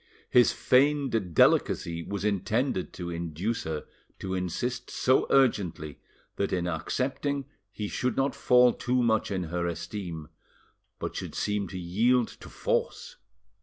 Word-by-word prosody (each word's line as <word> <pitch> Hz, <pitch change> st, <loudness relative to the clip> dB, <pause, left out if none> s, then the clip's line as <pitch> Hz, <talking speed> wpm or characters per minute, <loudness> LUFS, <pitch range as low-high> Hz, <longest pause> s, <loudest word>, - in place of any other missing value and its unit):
His 120 Hz, -1 st, +6 dB
feigned 130 Hz, -, +2 dB
delicacy 85 Hz, +2 st, +3 dB
was 100 Hz, +4 st, -4 dB
intended 105 Hz, +2 st, 0 dB
to 85 Hz, -1 st, -5 dB
induce 85 Hz, +8 st, -3 dB
her 80 Hz, -1 st, -4 dB, 0.3 s
to 95 Hz, -1 st, -4 dB
insist 120 Hz, +7 st, -3 dB
so 130 Hz, +1 st, +2 dB
urgently, 95 Hz, -, +1 dB, 0.4 s
that 100 Hz, -, -1 dB
in 90 Hz, -1 st, 0 dB
accepting 135 Hz, -, -2 dB, 0.3 s
he 105 Hz, 0 st, -4 dB
should 125 Hz, +4 st, -2 dB
not 135 Hz, +1 st, +1 dB
fall 125 Hz, -1 st, +5 dB
too 125 Hz, 0 st, 0 dB
much 110 Hz, -2 st, +2 dB
in 95 Hz, -2 st, -2 dB
her 85 Hz, +1 st, -2 dB
esteem, 85 Hz, -2 st, -5 dB, 0.7 s
but -, -, -5 dB
should -, -, -5 dB
seem 105 Hz, -1 st, -1 dB
to 90 Hz, -, -7 dB
yield 110 Hz, +8 st, +2 dB
to -, -, -12 dB
force. -, -, -2 dB
100 Hz, 135 wpm, -28 LUFS, 85-125 Hz, 0.7 s, His